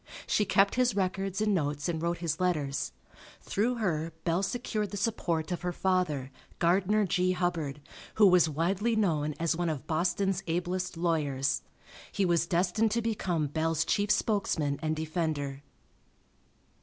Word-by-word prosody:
She 210 - +2
kept 195 +1 +3
his 245 -5 +2
records 195 0 -1
and 215 -1 +2
notes 145 -4 -1
and 165 -2 -2
wrote 170 +1 0
his 165 -3 -2
letters. 150 - 0 0.5
Through 235 +5 0
her 165 -8 -1
Bell 170 +2 +1
secured 215 -1 -2
the 205 - -5
support 185 -6 -1
of 175 - -2
her 180 0 -1
father, 175 -8 0 0.3
Gardiner 195 +5 +3
G. 185 0 +1
Hubbard, 165 -6 -2 0.4
who 215 - +6
was 180 -4 +6
widely 190 +9 0
known 155 -8 +1
as 165 0 +1
one 175 0 -1
of 150 -4 -4
Boston's 185 +4 0
ablest 180 +2 -2
lawyers. 145 -5 0 0.5
He 195 - +1
was 170 -1 +2
destined 180 +6 +2
to 235 - +1
become 185 -8 0
Bell's 160 +2 0
chief 205 +4 +1
spokesman 160 -11 +1
and 155 0 0
defender. 155 -4 -2
175 Hz, 150 wpm, -29 LUFS, 155-195 Hz, 0.5 s, who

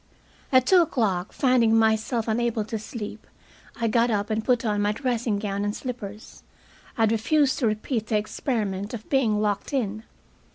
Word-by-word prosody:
At 255 -1 +5
two 370 +3 +6
o'clock, 215 - 0
finding 245 -4 +3
myself 220 +1 +1
unable 230 -1 0
to 220 0 -4
sleep, 215 0 -7 0.5
I 230 - +1
got 235 +2 +2
up 210 -1 -1
and 215 0 0
put 245 0 +1
on 210 -1 +1
my 205 +1 +1
dressing 235 -3 -1
gown 200 -1 -2
and 205 +1 -2
slippers. 220 -5 -7 0.6
I - - 0
had 220 - +3
refused 265 +5 +2
to 245 - +2
repeat 215 +1 -2
the 215 - +1
experiment 210 -1 -2
of 220 - -10
being 235 -7 +2
locked 210 +5 -1
in. 215 -5 -1
220 Hz, 170 wpm, -25 LUFS, 210-240 Hz, 0.6 s, two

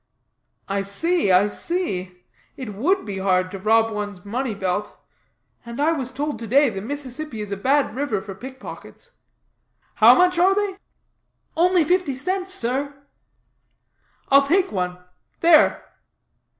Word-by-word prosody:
"I 200 0 -1
see, 205 - 0
I 185 +2 +5
see. 190 - -4 0.3
It 250 -6 -6
would 345 - 0
be 200 -2 -5
hard 185 -1 +1
to 195 - -7
rob 225 +3 +3
one's 205 -3 -6
money 235 +2 -3
belt. 190 +1 -3 0.7
And 235 +2 -8
I 305 +3 +3
was 265 -6 -2
told 290 +3 -3
to 230 - -6
day 275 +3 +4
the 195 -2 -5
Mississippi 270 +1 -6
is 210 -1 -5
a - - -1
bad 265 +6 +1
river 260 -5 -2
for 195 +1 -8
pick 260 +7 -10
pockets. 485 - -11 0.8
How - - +7
much 360 -1 +3
are 380 +2 +4
they?" 405 -2 -1 0.8
"Only 355 +1 +3
fifty 350 -4 0
cents, 370 +7 -2
sir." 280 -2 -1 1.3
"I'll 275 0 +5
take 370 +5 +2
one. 180 -2 -2 0.4
There!" 330 -2 +5
260 Hz, 145 wpm, -22 LUFS, 200-325 Hz, 1.3 s, How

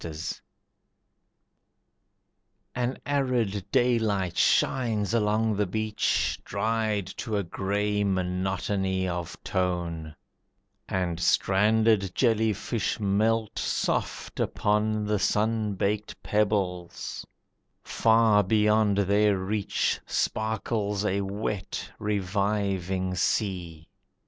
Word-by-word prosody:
Irony 80 -2 -6 2.6
An 125 +1 -1
arid 125 -8 0
daylight 110 -7 +1
shines 115 -5 +2
along 110 -1 +2
the 105 -1 +1
beach 110 +2 0
Dried 110 -1 -1
to 110 -2 -2
a 100 - 0
grey 105 +3 -1
monotony 95 0 -1
of 90 +1 -4
tone, 85 -4 -2 0.7
And 90 -3 -1
stranded 105 +2 +3
jelly 110 -3 +3
fish 105 +2 -2
melt 110 +2 +1
soft - - -2
upon 105 0 +1
The 105 -1 0
sun 110 0 +1
baked 105 +2 -2
pebbles, 95 -5 -1 0.6
far 110 -2 +4
beyond 105 0 +3
their 100 +1 +3
reach 100 +2 -1
Sparkles 110 -2 -1
a 100 -1 +1
wet, 100 0 -4
reviving 100 -2 -1
sea. 90 -4 -1
105 Hz, 85 wpm, -27 LUFS, 95-110 Hz, 2.6 s, far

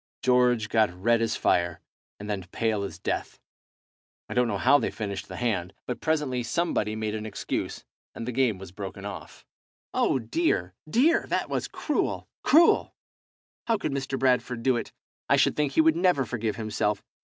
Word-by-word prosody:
George 125 -3 +3
got 110 -1 +3
red 115 +6 +1
as 115 -1 0
fire, 85 -1 +1 0.4
and 105 - -7
then 105 -2 -2
pale 110 -3 0
as 100 - -5
death. - - -3 0.9
I - - -5
don't 125 -1 +3
know 105 -3 -1
how 140 +7 +5
they - - -1
finished 100 -3 -5
the - - -8
hand, 100 -7 -1
but 125 - -4
presently 150 -6 0
somebody 115 -5 0
made 110 -1 -2
an 110 0 -4
excuse, 100 - -4 0.3
and 115 - -6
the - - -1
game 125 -4 +1
was 95 -1 -10
broken 100 0 -7
off." 100 -1 -8 0.5
"Oh, - - +2
dear! 115 - 0 0.2
dear! 285 - +3
That - - -1
was - - -1
cruel! - - -2
cruel! 310 +7 +4 0.7
How 230 - +3
could 175 - -3
Mr. 135 -1 -2
Bradford 125 -2 +1
do 130 0 +3
it? 120 - -4 0.4
I - - +6
should - - +3
think 145 -2 0
he 160 - +5
would 160 0 +4
never 175 -6 +3
forgive 115 -3 -2
himself! 105 -2 -1
115 Hz, 180 wpm, -27 LUFS, 105-135 Hz, 0.9 s, I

